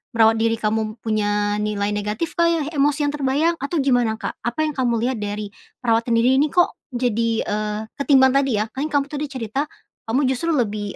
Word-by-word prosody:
merawat 225 0 +4
diri 225 0 +2
kamu 220 0 0
m 215 -1 -2
punya 205 -1 0
nilai 210 -1 -1
negatif, 210 +9 -2
Kak, 340 - +5
ya, 335 -2 +1
emosi 290 0 +1
yang 290 - +1
terbayang, 290 +5 +1
atau 280 +5 -3
gimana, 245 -4 +2
Kak? 220 - -6
Apa 245 +6 0
yang 310 - 0
kamu 255 -4 0
lihat 255 -2 -1
dari 205 0 -4 0.3
perawatan 230 0 +2
diri 250 +3 +4
ini? 300 - +3
Kok 350 +4 0
jadi, 235 -2 0 0.2
eee 210 0 -2 0.2
ketimbang 265 -2 +5
tadi 275 -4 +2
ya, 220 - -10
kan 280 +6 -3
yang 300 - -12
kamu 280 -1 +2
tadi 295 0 -2
cerita, 270 +1 -3 0.4
kamu 255 +6 +1
justru 325 +5 0
lebih, 210 -4 -2
240 Hz, 205 wpm, -21 LUFS, 215-280 Hz, 0.4 s, Kak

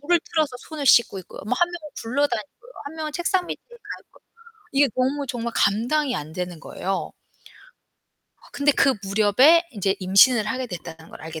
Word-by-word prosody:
물을 340 +4 +2
틀어서 310 -6 0
손을 300 -1 -7
씻고 235 -6 +5
있고요. - - -12
뭐 250 - 0
1 350 0 +3
명은 320 -4 -8
굴러다니고요 280 - -3
1 285 - -7
명은 310 -1 -5
책상 355 +2 0
밑에 - - -6
가 475 - -14 0.3
있고 - - -24 0.5
이게 275 +1 +4
너무 270 +3 0
정말 235 -1 -4
감당이 245 +7 +1
안 150 +1 -6
되는 180 -1 -5
거예요. 190 +3 -4 1.3
어 - - -18
근데 285 +1 +2
그 275 -1 +3
무렵에 215 - +4
인제 200 -4 -1
임신을 210 +4 +4
하게 255 +3 -3
됐다는 165 -5 -9
걸 - - -12
알게 160 0 -7
255 Hz, 340 characters per minute, -23 LUFS, 200-300 Hz, 1.3 s, 씻고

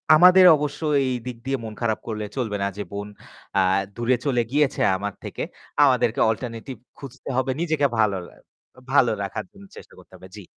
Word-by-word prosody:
আমাদের 180 +3 +7
অবশ্য 145 0 -4 0.3
এইদিক 125 -1 -4
দিয়ে 135 0 -1
মন 110 -1 -6
খারাপ 110 -2 0
করলে 110 -1 -3
চলবে 110 -5 -2
না - - +1
যে 105 - -3
বোন 100 0 -5 0.5
আ - - +5 0.3
দূরে 120 +2 +1
চলে 125 -4 +2
গিয়েছে 145 -1 +1 0.2
আমার 100 0 -4
থেকে। - - -6 0.4
আমাদেরকে 125 -4 +2
অল্টারনেটিভ 115 +3 -4 0.2
খুঁজতে 135 -1 -10
হবে 130 0 +1
নিজেকে 155 -4 +1
ভালোলে 100 -5 0 0.6
ভালো 130 -4 +4
রাখার 100 - -5
জন্য 200 -1 -15
চেষ্টা - - -13
করতে 95 - -20
হবে। 95 - -13
জি। 105 - -10
125 Hz, 170 wpm, -23 LUFS, 105-140 Hz, 0.6 s, আমাদের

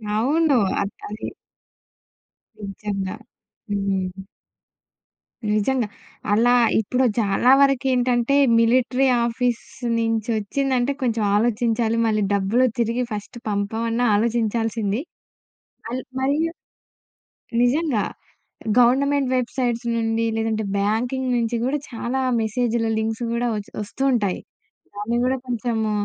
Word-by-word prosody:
అవును. 285 +4 +3 0.2
అద్ 200 0 -3 0.2
అది. 210 +1 -6 1.3
నిజంగా. 195 -1 -4 0.5
హ్మ్. 195 -2 -2 1.3
నిజంగా. 220 +2 +1 0.5
అలా 240 +3 +4 0.3
ఇప్పుడు 250 +4 +1
చాలా 215 +4 +3
వరకేంటంటే, 255 -2 +2 0.2
మిలిటరీ 255 +3 +3 0.2
ఆఫీస్ 240 0 -1 0.3
నుంచొచ్చిందంటే 230 +4 0
కొంచెం 230 -3 0
ఆలోచించాలి. 230 0 +1
మళ్ళీ 215 -1 +1
డబ్బులు 205 +6 +2
తిరిగి 235 +2 +1
ఫస్ట్ 210 +3 -6
పంపమన్న 225 +4 -1
ఆలోచించాల్సింది. 225 -1 0 0.9
మల్ 250 +2 -3 0.2
మరియు 295 +5 +1 1.1
నిజంగా. 255 -2 +2 0.8
గవర్నమెంట్ 270 +2 +3
వెబ్సైట్స్ 240 -1 -1
నుండి, 225 0 0
లేదంటే 220 -1 -1 0.2
బ్యాంకింగ్ 245 +6 0
నుంచి 235 0 0
కూడా 285 +3 0
చాలా 240 +3 -2 0.2
మెసేజ్‌లు, 230 0 0
లింక్స్ 225 +2 -2
కూడా 240 +1 0
వచ్ 205 -1 -6
వస్తూ 225 +6 -5
ఉంటాయి. 200 -6 0 0.6
దాన్ని 210 +4 -2
కూడా, 260 +1 +1
కొంచెము 225 -2 -1
230 Hz, 95 wpm, -22 LUFS, 215-250 Hz, 1.3 s, అలా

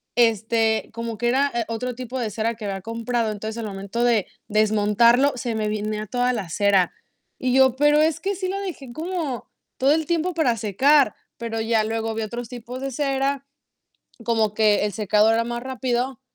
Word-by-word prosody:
este, 225 -1 +2
como 230 -1 -5
que 240 +1 -1
era, 275 +3 +2
eh, 235 -2 0
otro 245 +2 -3
tipo 255 +1 -5
de 225 -3 -1
cera, 225 +2 -1
que 220 - -11
había 195 -1 -3
comprado. 230 +1 -2
Entonces, 220 +2 -6
al 225 - -4
momento 200 +4 -3
de 225 -5 +2 0.2
desmontarlo, 215 +5 +4
se 240 -2 -3
me 215 -1 -1
venía 215 0 -2
a - - -9
toda 245 +3 +1
la 205 -7 -3
cera. 195 0 +2 0.5
Y 255 -1 0
yo: 265 -2 +5
"Pero 295 +1 +4
es 315 0 +2
que 400 +1 -1
sí 370 0 -3
la 395 +1 -2
dejé, 285 -11 -7
como 320 -6 -3 0.3
todo 270 +2 +3
el 320 -1 0
tiempo 340 +1 0
para 255 -8 +1
secar". 250 +5 +3 0.3
Pero 225 -1 -3
ya 225 -1 +2
luego, 225 0 -2
vi 225 - -2
otros 235 +2 -5
tipos 245 +1 -8
de 275 0 -3
cera, 275 0 -1 0.8
como 220 -3 +1
que 210 -1 +3
el 205 - -1
secado 210 +2 +3
era 230 +1 +2
más 240 0 -4
rápido. 260 -1 -2
235 Hz, 195 wpm, -23 LUFS, 215-265 Hz, 0.8 s, yo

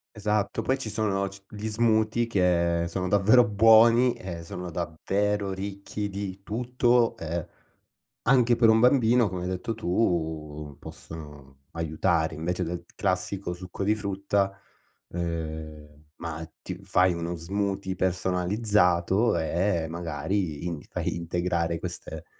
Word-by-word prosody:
Esatto. 105 +1 0
Poi 130 +4 +1
ci 115 - -4
sono 100 -2 0
c 100 0 -9
gli 105 +1 -5
smoothie 110 +1 +2
che 85 -5 +2
sono 90 +2 -2
davvero 105 +5 +5
buoni 115 +4 +6
e 85 -3 -7
sono 90 +1 -6
davvero 100 +5 -1
ricchi 100 +1 -5
di 100 -1 -5
tutto. 120 +1 +2
Ehm, 85 0 -3 0.8
anche 125 -1 +4
per 115 -1 +5
un 110 0 +6
bambino, 120 -2 +4
come 90 -1 -4
hai 90 - -2
detto 95 +5 -3
tu, 80 -7 -1
possono 75 -4 -11
aiutare. 80 0 0
Invece 90 +4 -2
del 85 +1 -4
classico 95 -1 -1
succo 90 +2 -6
di 105 +2 +3
frutta, 100 -1 0 0.6
ehm, 80 -3 -5
ma 80 -1 -5 0.2
ti 90 - -5
fai 95 -2 +3
uno 85 +1 -3
smoothie 95 +2 -2
personalizzato 95 +2 +2
eh 85 +1 0
magari 85 0 -2
in 85 -4 -3
fai - - -2
integrare 85 0 -1
queste, 90 0 -6
95 Hz, 125 wpm, -27 LUFS, 85-105 Hz, 0.8 s, buoni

